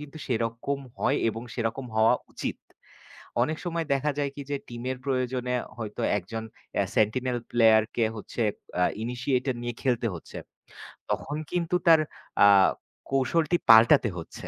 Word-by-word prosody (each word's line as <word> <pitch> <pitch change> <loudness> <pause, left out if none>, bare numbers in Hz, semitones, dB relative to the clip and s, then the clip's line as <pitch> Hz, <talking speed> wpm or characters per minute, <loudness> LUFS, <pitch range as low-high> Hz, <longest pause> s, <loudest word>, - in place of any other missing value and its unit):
কিন্তু 150 +1 -10
সেরকম 115 +3 -1 0.2
হয় 135 - +2
এবং 115 +2 -7
সেরকম 120 +2 -2
হওয়া 110 +1 +5 0.2
উচিত। - - -4 0.9
অনেক 155 +4 -1
সময় 170 -2 -2
দেখা 145 +2 0
যায় 140 -1 0
কি। 140 - -5
যে 145 - 0
টিমের 125 +2 -4
প্রয়োজনে 125 -1 -1 0.2
হয়তো 105 -2 -5 0.2
একজন 110 +5 -6 0.3
অ্যা - - +2
সেন্টিনেল 125 +4 +1
প্লেয়ারকে 110 -1 +4
হচ্ছে 115 +2 -4 0.4
আ - - +5 0.2
ইনিশিয়েটর 125 +1 -1
নিয়ে 120 -1 -3
খেলতে 120 -3 +1
হচ্ছে। 85 - -9 0.7
তখন 150 - -2
কিন্তু 175 -1 0
তার 165 -1 +8 0.5
আ - - +9 0.6
কৌশলটি 155 +5 +2
পাল্টাতে 115 +2 +7
হচ্ছে। 80 - -9
125 Hz, 135 wpm, -27 LUFS, 115-140 Hz, 0.9 s, আ